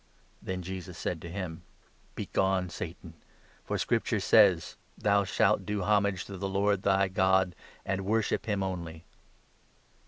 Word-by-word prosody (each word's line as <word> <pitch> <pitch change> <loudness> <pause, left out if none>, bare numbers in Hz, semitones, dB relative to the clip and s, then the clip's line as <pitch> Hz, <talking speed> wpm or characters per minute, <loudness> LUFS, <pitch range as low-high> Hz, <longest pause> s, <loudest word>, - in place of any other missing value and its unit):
Then 95 -1 -4
Jesus 90 -1 -7
said 85 -3 -3
to 85 - -7
him: 90 -3 -5 0.5
"Begone, 95 -2 0
Satan! - - -7 0.5
for - - -2
Scripture 115 -1 0
says 100 -4 +4
— - - -36
' - - -36
Thou 100 -1 +2
shalt 100 +1 +2
do 105 0 -2
homage 100 -3 +1
to 100 - -8
the 95 +1 -3
Lord 100 0 +1
thy 100 -1 +3
God, 95 -1 +2 0.3
and 95 0 -1
worship 110 +3 0
him 100 -3 0
only.' 85 -3 -5
95 Hz, 150 wpm, -29 LUFS, 90-100 Hz, 0.5 s, says